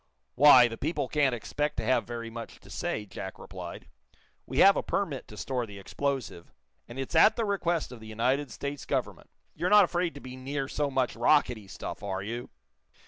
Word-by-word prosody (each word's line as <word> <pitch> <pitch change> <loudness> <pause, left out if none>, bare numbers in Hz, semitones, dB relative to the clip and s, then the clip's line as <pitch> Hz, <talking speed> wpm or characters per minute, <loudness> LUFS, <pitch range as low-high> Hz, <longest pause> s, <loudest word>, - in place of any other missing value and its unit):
"Why, 130 -2 +8
the 115 -1 -7
people 160 +4 -1
can't 140 -4 +2
expect 145 +6 -3
to 110 - -2
have 120 -2 +2
very 115 -1 -5
much 115 0 -8
to - - -15
say," 105 - -3
Jack 95 -1 -7
replied. - - -9 0.6
"We 130 - -5
have 195 +5 +8
a - - 0
permit 160 -10 -2
to 105 - -12
store 125 +4 -2
the 100 -1 -10
explosive, 125 -3 -4 0.4
and 120 - -10
it's 135 +3 -4
at 190 +7 +6
the 230 - 0
request 175 -7 -1
of 125 - -9
the 110 - -11
United 125 +6 0
States 140 0 -5
Government. - - -3 0.2
You're 175 +3 -1
not 210 -1 +8
afraid 175 -1 -1
to - - -7
be 130 -1 -9
near 135 +1 -3
so 145 +1 -1
much 130 -2 0
rockety 120 -4 +2
stuff - - -7
are 95 -1 -3
you?" 120 +4 -5
130 Hz, 195 wpm, -29 LUFS, 115-150 Hz, 0.6 s, Why